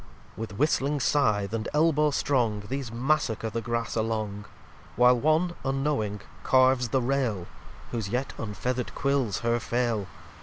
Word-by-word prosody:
l - - -8
With 110 -3 -6
whistling 145 0 +1
Sithe, 105 -8 +1
and 115 -1 -2
Elbow 150 -1 +4
strong, 120 -7 +1
These 135 -2 -4
Massacre 115 -3 0
the 115 +1 -2
Grass 115 0 -2
along: 110 -2 -2 0.5
While 125 +1 +5
one, 155 +5 +2
unknowing, 135 -7 -1 0.2
carves 130 -1 +3
the 130 0 +1
Rail, 120 -8 0 0.5
Whose 115 -5 -3
yet 125 +5 -2
unfeather'd 120 +4 -3
Quils 135 -7 0
her 115 0 +1
fail. 115 -4 -1
120 Hz, 140 wpm, -27 LUFS, 110-135 Hz, 0.5 s, While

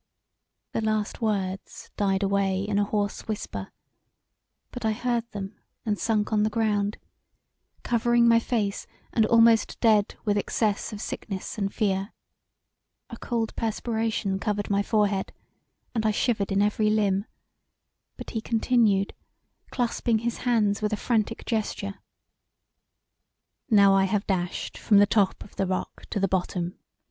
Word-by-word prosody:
The - - -1
last 215 0 -1
words 195 -3 -3
died 195 -1 +1
away 195 -1 +1
in 205 0 0
a - - +3
hoarse 205 -1 -2
whisper, 215 0 -5 1.0
but 245 - -7
I 220 -1 +2
heard 235 0 -1
them 195 -1 -7 0.3
and 210 -2 -1
sunk 220 -1 0
on 210 - +3
the 215 - +2
ground, 210 -2 0 0.9
covering 240 0 +3
my 230 0 +6
face 215 -4 -2 0.3
and 220 -2 +3
almost 230 -1 +4
dead 215 -3 +3
with 205 -1 +2
excess 210 0 -1
of 210 -1 -6
sickness 195 +2 -5
and 195 -1 -1
fear: 195 -1 -1 1.0
a 230 - -7
cold 225 -2 -2
perspiration 220 -3 -1
covered 205 0 -2
my 200 0 +3
forehead 205 -2 +1 0.6
and 225 -3 0
I 220 - +3
shivered 215 -2 0
in 195 +1 +3
every 210 +1 +2
limb 205 -2 +1 0.9
But - - -8
he 225 - -2
continued, 225 -4 +2 0.6
clasping 235 -2 0
his 235 - -1
hands 210 -3 +2
with 210 0 0
a - - 0
frantic 225 0 -1
gesture: 210 -3 -2 1.7
"Now 200 -3 +6
I 195 0 +4
have 200 +1 0
dashed 180 -3 -2
from 205 - +4
the 205 - +7
top 205 -2 +1
of - - -18
the 195 - 0
rock 185 0 -4
to - - -2
the 195 - +2
bottom! 180 -1 -2
210 Hz, 145 wpm, -26 LUFS, 200-225 Hz, 1.7 s, the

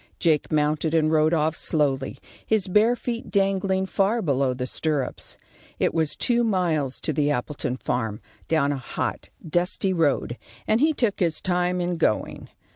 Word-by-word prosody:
Jake 155 -4 +1
mounted 155 +1 +1
and 155 -1 +3
rode 155 0 +3
off 160 -1 +1
slowly, 140 -4 0 0.3
his 220 -4 +1
bare 215 +6 +4
feet 240 -1 -5
dangling 195 -1 +1
far 200 +4 +1
below 135 -4 +1
the 125 0 -3
stirrups. 145 0 -2 0.4
It - - +1
was 160 -2 0
two 240 -1 +1
miles 170 - 0
to 155 - -1
the 145 +1 +1
Appleton 130 -2 -2
farm, 110 -4 -2 0.3
down 155 -3 +2
a 140 - -2
hot, 130 - -4 0.2
dusty 180 +3 0
road, 145 -7 0 0.3
and 220 +3 +2
he 315 +2 +4
took 235 -9 0
his 170 -3 +1
time 180 0 0
in 175 0 -1
going. 135 -10 -1
160 Hz, 160 wpm, -24 LUFS, 145-190 Hz, 0.4 s, bare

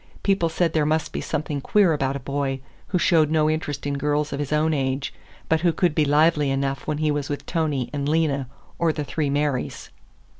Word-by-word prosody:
People 195 -4 +2
said 165 0 0
there 155 - +2
must 155 +1 0
be - - -2
something 145 -1 -3
queer 195 +1 +3
about 135 -2 -1
a - - -3
boy 135 0 -2 0.3
who 185 - 0
showed 165 -4 +3
no 155 -1 +3
interest 150 -2 -2
in 140 -1 -1
girls 150 +1 0
of 140 - -3
his 145 -1 -3
own 155 +1 +2
age, 135 -1 -1 0.3
but 160 -1 +2
who 175 -1 +3
could 175 -1 +1
be 155 -1 +2
lively 150 0 +3
enough 135 0 -2
when 155 -1 -1
he 155 0 +1
was 145 -1 -2
with 145 - -4
Tony 150 -7 -1
and 145 0 -1
Lena 150 -4 +1 0.3
or 170 -1 +3
the 150 -1 -3
three 145 0 -2
Marys. 145 -2 -2
150 Hz, 215 wpm, -24 LUFS, 140-160 Hz, 0.3 s, queer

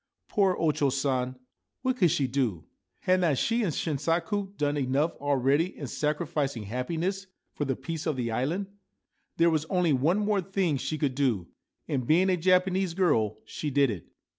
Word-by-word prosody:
Poor 195 -3 +2
O 160 -2 +2
Cho 145 -1 +1
San! 130 -1 -1 0.5
What 260 -1 +1
could 180 -7 +4
she 150 -4 +1
do? 125 - -1 0.4
Had 185 0 +2
not 155 -6 +2
she 230 - +1
and 195 -7 +1
Shinsaku 170 +7 -1
done 145 0 0
enough 140 +3 0
already 145 +4 +1
in 145 - -5
sacrificing 150 -3 -1
happiness 165 - -3 0.3
for 145 - -2
the 135 -1 -1
peace 160 +5 -5
of 155 - 0
the 120 -3 -2
island? 150 - -1 0.7
There 170 0 +4
was 155 -1 0
only 175 -2 +2
one 150 +9 +2
more 210 -1 +1
thing 185 -5 0
she 135 +4 -3
could 145 -4 0
do, 125 -10 0 0.4
and, 130 -4 -2
being 180 +4 +4
a - - +3
Japanese 185 0 +2
girl, 115 - +2
she 150 - -4
did 140 -2 +3
it. 90 -6 -7
150 Hz, 175 wpm, -28 LUFS, 135-180 Hz, 0.7 s, could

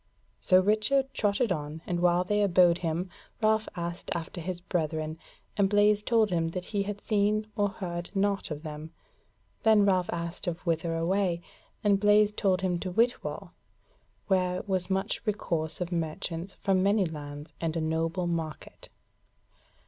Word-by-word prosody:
So 185 -1 +5
Richard 215 +8 +2
trotted 210 +2 +1
on, 155 -1 -3
and 175 -1 -1
while 175 0 +3
they 210 +3 +1
abode 180 -3 +4
him, 170 +2 -1 0.3
Ralph 220 0 +2
asked 170 0 -5
after 170 +1 -5
his 180 +1 -4
brethren, 160 -2 -2 0.4
and 200 -1 +3
Blaise 205 0 +4
told 220 -2 +2
him 165 -2 +1
that 180 +2 -4
he 205 -2 -1
had 205 0 -4
seen 210 0 +1
or 205 -2 +2
heard 175 -3 -5
naught 200 0 0
of 150 0 -5
them. 155 0 -7 0.7
Then 215 -2 +5
Ralph 185 -3 +2
asked 170 +2 -4
of 175 +1 -3
whither 165 0 0
away, 175 0 0 0.4
and 200 -2 +4
Blaise 210 0 +4
told 190 -3 +1
him 180 -2 0
to 185 - -4
Whitwall, 235 +6 0 0.7
where 185 -2 +1
was 185 -2 -1
much 190 0 -1
recourse 170 -7 -2
of 180 0 -2
merchants 170 +2 -3
from 190 -2 +1
many 200 +1 +3
lands, 145 -2 -7
and 165 -1 -1
a - - +1
noble 165 +3 -1
market. 165 -4 -5
180 Hz, 155 wpm, -28 LUFS, 165-205 Hz, 0.7 s, So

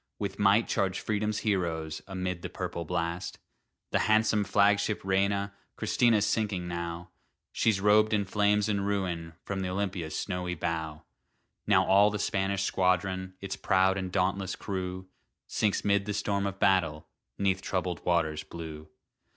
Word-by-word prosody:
With 100 -1 -4
might 100 +3 +4
charge 95 -1 0
Freedom's 105 0 -1
heroes, 85 -6 -1
Amid 90 -2 -3
the - - -5
purple 85 - -4
blast. 85 +1 -3 0.5
The - - +2
handsome 110 -1 +3
flagship 100 +1 +2
Reina 100 +1 +1 0.2
Christina's 115 -4 +3
sinking 105 -5 -1
now; 85 0 -5 0.4
She's 110 -4 +2
robed 105 +2 +4
in 105 -2 +1
flames 105 +1 +2
and 100 -2 0
ruin, 90 -5 -2
From 100 -1 -3
th' 95 - -2
Olympia's 90 -4 -3
snowy 90 -2 -3
bow. 80 -2 -3 0.6
Now - - +4
all 100 +2 +5
the 105 - -3
Spanish 100 -1 0
squadron, 95 0 0
Its 100 -1 -4
proud 95 0 +2
and 95 -1 -3
dauntless 95 +1 0
crew, 95 -1 -4 0.4
Sinks 105 -2 0
'mid 100 -1 +2
the 105 - -2
storm 100 -1 0
of 95 -1 -5
battle, 80 -6 +2 0.3
'Neath 95 -1 +1
troubled 90 -2 -2
waters 80 -3 +1
blue. 80 -2 -8
95 Hz, 145 wpm, -29 LUFS, 90-100 Hz, 0.6 s, all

